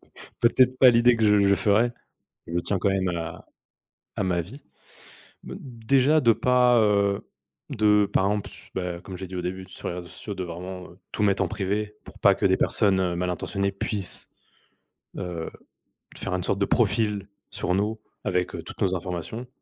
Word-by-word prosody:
c'est - - -13
peut-être 125 +2 +4
pas 130 - +9
l'idée 120 +1 +5
que 110 - +2
je 105 -1 +5
je 100 - +5
ferai, 110 +4 +3 0.6
je 85 +1 -2
tiens 100 +1 -1
quand 100 - +1
même 95 -1 0
à 85 -2 -5 0.7
à - - 0
ma 90 -2 +1
vie. 110 - -9 0.8
Mmh, - - -8
déjà 135 +5 +2
de 115 -2 +5
pas, 125 +1 +4
heu, 100 -2 +2 0.4
de, 105 -1 +3
par 95 -1 +1
exemple, 105 0 -1
s - - -12
bah, 90 -2 -3
comme 95 -2 -8
j'ai 95 0 -6
dit 95 - -8
au 90 - -2
début, 95 +1 -4
sur - - -7
les 85 - -4
réseaux 90 -1 -7
sociaux 105 +2 -7
de 95 - -4
vraiment, 90 +2 -7
heu, 90 - -19
tout 105 - -1
mettre 100 -1 +2
en - - -1
privé 105 +3 -2
pour - - -14
pas - - +5
que - - -1
des - - +5
personnes 95 -3 +2
malintentionnées 90 +3 -1
puissent, 100 -1 -4 0.9
heu, 90 -3 -4 0.6
de - - -12
faire 90 - -3
une 90 - -2
sorte 100 - 0
de 100 - +3
profil 105 -2 +1 0.2
sur 90 - -1
nous 105 +3 -1 0.3
avec, 90 -1 0
heu, - - -5
toutes - - -10
nos 95 -1 +2
informations. 90 +7 -5
100 Hz, 195 wpm, -25 LUFS, 90-110 Hz, 0.9 s, pas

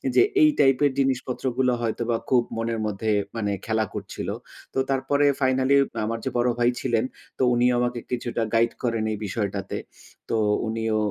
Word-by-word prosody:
যে, - - +7 0.2
এই 310 - +7
টাইপের 135 +1 +4
জিনিসপত্র 130 -1 -1
গুলো 125 -1 +3
হয়তোবা, 115 +1 -1
খুব 125 -2 +5 0.2
মনের 115 0 -1
মধ্যে 105 +1 -1 0.2
মানে 105 -3 -1
খেলা 110 -1 +1
করছিল। - - -6 0.5
তো - - -5
তারপরে 135 +2 +2 0.2
ফাইনালে 130 +1 +3 0.3
আমার 115 +1 -2
যে, - - +1
বড় 120 +1 +3
ভাই 120 +1 +4
ছিলেন, 120 -2 +1 0.3
তো - - +1
উনিও 120 +1 +3
আমাকে 120 0 0
কিছুটা 120 -1 -1
গাইড 115 +1 +3
করেন 115 -2 0
এই 105 - -2
বিষয়টাতে। 100 -1 -3 0.5
তো 115 - +1 0.3
উনিও 110 0 -1
120 Hz, 160 wpm, -25 LUFS, 110-130 Hz, 0.5 s, যে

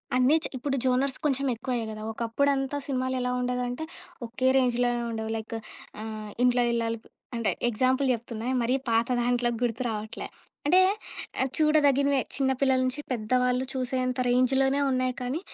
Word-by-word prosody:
అన్నీ 255 +4 +5
చే - - -3
ఇప్పుడు 275 +2 -2
జోనర్స్ 260 +1 +1
కొంచెం 275 -1 +1
ఎక్కువయ్యాయి 240 -1 -3
గదా! 215 0 -7
ఒకప్పుడంతా 270 +5 0
సినిమాలేలా 255 -2 -1
ఉండేదంటే 250 +2 -2 0.4
ఒకే 240 +3 -1
రేంజ్‌‌లోనే 245 -1 +2
ఉండేవి. 220 -1 -3
లైక్ 220 +1 -6 0.5
ఆహ్, 215 -1 -6
ఇంట్లో 245 0 +4
ఇల్లాలు 230 -1 0 0.4
అంటే 230 -2 +1 0.2
ఎగ్జాంపుల్ 260 +4 +2
జెప్తున్నా 235 0 -3
మరీ 245 +3 +2
పాత 230 +1 +2
దాంట్లో 245 0 +1
గుర్తు 240 0 0
రావట్లే. 215 -1 -4 0.4
అంటే 350 +6 +5 0.8
చూడదగినవే 285 -3 +4 0.2
చిన్న 270 -1 +2
పిల్లల 265 -1 +4
నుంచి 255 +3 -1
పెద్దవాళ్ళు 250 +2 +1
చూసేంత 255 -1 -1
రేంజ్‌లోనే 265 +2 +3
ఉన్నాయి 255 0 +1
కానీ 250 +5 -2
250 Hz, 135 wpm, -27 LUFS, 235-265 Hz, 0.8 s, అన్నీ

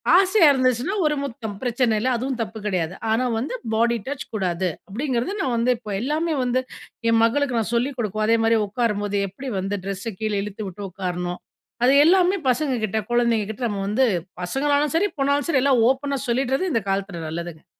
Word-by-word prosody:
ஆசையா 380 -1 +6
இருந்துச்சுனா 255 - +1
ஒரு 300 0 +2
முத்தம் 225 -6 -5
பிரச்சன 240 -2 +1
இல்ல. 250 +5 0
அதுவும் 260 +1 -3
தப்பு 220 0 -5
கிடையாது. 180 -4 -1 0.2
"ஆனா 225 +3 +2
வந்து 250 - -3 0.2
பாடி 235 +2 +2
டச் 280 0 -4
கூடாது," 185 -3 0 0.2
அப்படிங்கிறது 245 - -2
நான் 255 -7 0
வந்து 235 +2 +2
இப்போ 220 -3 -8
எல்லாமே 310 +6 0
வந்து 250 +1 +1 0.5
என் 230 0 +4
மகளுக்கு 250 +2 +1
நான் 225 +1 -2
சொல்லிக் 255 +3 0
கொடுக்கவும், 215 -2 -1
அதேமாதிரி 225 0 +3
உட்காரும்போது 205 -2 -1
எப்படி 260 +8 -7
வந்து 195 +2 -2
ட்ரெஸ்ஸ 195 +3 -4
கீழே 215 -2 -1
இழுத்து 210 +1 -6
விட்டு 190 +2 -8
உட்காரணும். 180 -1 -3 0.5
அது 260 - +5
எல்லாமே 365 +2 +4
பசங்க 265 +2 +1
கிட்ட, 215 +1 -1
குழந்தைங்க 235 -3 +2
கிட்ட 220 +4 -5
நம்ம 200 -2 -3
வந்து 215 +6 +2 0.4
பசங்களானாலும் 285 - +1
சரி, 405 +5 +2
பொண்ணாலும் 280 +2 +1
சரி 275 -6 +3
எல்லா 280 -1 +4 0.2
ஓப்பனா 275 +1 -1
சொல்லீடறது 270 +8 0
இந்த 230 - +2
காலத்துல 195 -3 -2
நல்லதுங்க! 170 -1 -6
235 Hz, 175 wpm, -23 LUFS, 205-270 Hz, 0.5 s, ஆசையா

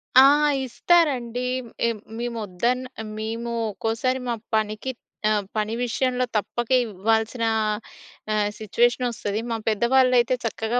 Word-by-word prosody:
ఆ! 260 - +11 0.4
ఇస్తారండి. 255 -4 +2 0.5
ఏమ్ 225 -2 -2 0.2
మేము 240 -1 -3
వద్దన్నా 240 +5 -2 0.2
మేము 230 +2 -3 0.2
ఒక్కోసారి 230 +5 -1
మా 235 - 0 0.2
పనికి 215 +4 -1 0.4
ఆహ్, 210 -2 +1
పని 215 +1 0
విషయంలో 250 +1 0
తప్పక 240 +3 -3 0.2
ఇవ్వాల్సిన 220 +3 0 0.9
ఆహ్, 210 -1 +2
సిట్యువేషన్ 240 +4 +2
వస్తది. 210 -2 -3
మా 230 - 0
పెద్దవాళ్ళైతే 250 +2 +3
చక్కగా 230 +1 -1
235 Hz, 110 wpm, -24 LUFS, 215-250 Hz, 0.9 s, ఆ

